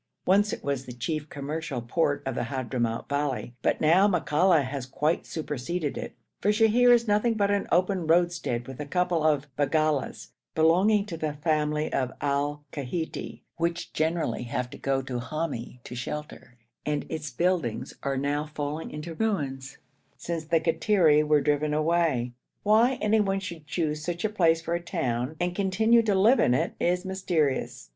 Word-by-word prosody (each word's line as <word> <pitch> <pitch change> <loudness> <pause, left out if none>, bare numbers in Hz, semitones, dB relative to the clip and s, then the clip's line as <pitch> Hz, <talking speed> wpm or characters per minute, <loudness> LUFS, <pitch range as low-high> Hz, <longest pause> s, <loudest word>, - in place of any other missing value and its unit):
Once 200 +3 +4
it - - -5
was 140 -2 -2
the 125 - -6
chief 150 +5 -3
commercial 145 -1 -4
port 145 +4 0
of 135 - -2
the 120 - -2
Hadhramout 120 -3 -2
valley, 140 -4 -2
but - - +1
now 175 +6 +5
Makalla 175 -3 +3
has 130 -1 -5
quite 150 +5 -1
superseded 155 +1 -3
it, - - -6 0.2
for 205 - +1
Sheher 225 +3 +5
is 235 -1 +4
nothing 210 +3 +2
but 200 -1 +2
an 200 -1 0
open 185 -1 +2
roadstead 170 -8 +1
with 135 0 -9
a 150 - -5
couple 180 0 +1
of 150 -2 +2
baggalas 145 -6 0 0.3
belonging 185 +6 +4
to 175 -6 -6
the 155 -2 -2
family 150 0 0
of 130 -2 0
Al 145 +1 -1
Kaiti, 155 +4 -5
which 170 +1 -2
generally 160 +2 0
have 125 0 -3
to - - -9
go 135 -1 0
to 130 -2 -4
Hami 125 -3 -4
to - - -9
shelter, 125 -1 -6 0.3
and 150 -1 -1
its 155 -2 -4
buildings 140 -4 -1
are 140 -1 -1
now 145 +2 0
falling 150 +1 -4
into 150 +3 -6
ruins, 140 -10 -2 0.4
since 165 -2 -4
the 165 +1 +2
Kattiri 165 -1 +3
were 150 -1 +3
driven 150 +1 +1
away. 155 -6 +1 0.3
Why 225 +5 +4
anyone 210 -2 +2
should 170 -5 -8
choose 155 -1 -2
such 175 +4 -3
a - - +2
place 165 -6 +2
for 170 - -2
a 170 - -1
town, 130 -6 -2
and 175 0 0
continue 220 +5 +3
to 210 -3 +1
live 220 +8 +5
in 125 - +4
it, - - 0
is 180 +2 +1
mysterious. 165 - -1
155 Hz, 170 wpm, -27 LUFS, 140-180 Hz, 0.4 s, now